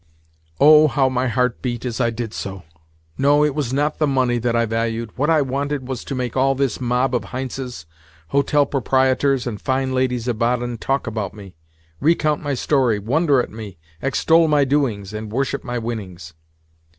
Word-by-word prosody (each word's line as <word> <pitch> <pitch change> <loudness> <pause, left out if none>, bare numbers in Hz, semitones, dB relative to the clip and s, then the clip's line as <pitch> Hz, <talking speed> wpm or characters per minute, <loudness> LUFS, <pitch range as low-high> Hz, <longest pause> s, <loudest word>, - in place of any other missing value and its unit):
Oh, 155 +1 +7
how 135 -2 +2
my 130 0 0
heart 125 0 0
beat 120 -1 -3
as 120 0 -2
I 120 - +2
did 115 -1 -5
so! 95 -2 -6 0.6
No, 145 +2 +4
it 150 - 0
was 140 -4 -2
not 145 +3 0
the 155 - +2
money 130 -3 +1
that 120 0 0
I 115 0 +2
valued—what 115 +4 -2
I 155 -3 +4
wanted 140 0 -3
was 130 -3 -4
to 140 - -4
make 125 -2 -3
all 135 +1 +2
this 135 -2 -1
mob 125 +1 +1
of 125 - 0
Heintzes, 130 -7 -6 0.4
hotel 140 +1 +2
proprietors, 130 0 +1
and 110 -5 -5
fine 130 0 -1
ladies 125 -2 0
of 120 -3 -2
Baden 120 0 0
talk 135 +3 -1
about 110 -4 -4
me, 100 -3 -11 0.5
recount 155 -1 +2
my 145 -2 -2
story, 130 -4 +1
wonder 135 - +2
at - - -9
me, 105 -4 -9 0.2
extol 160 +5 +3
my 145 -2 +3
doings, 120 -8 -1
and 110 0 -6
worship 135 +4 -1
my 120 -1 -3
winnings. 95 -8 -6
130 Hz, 180 wpm, -21 LUFS, 115-140 Hz, 0.6 s, Oh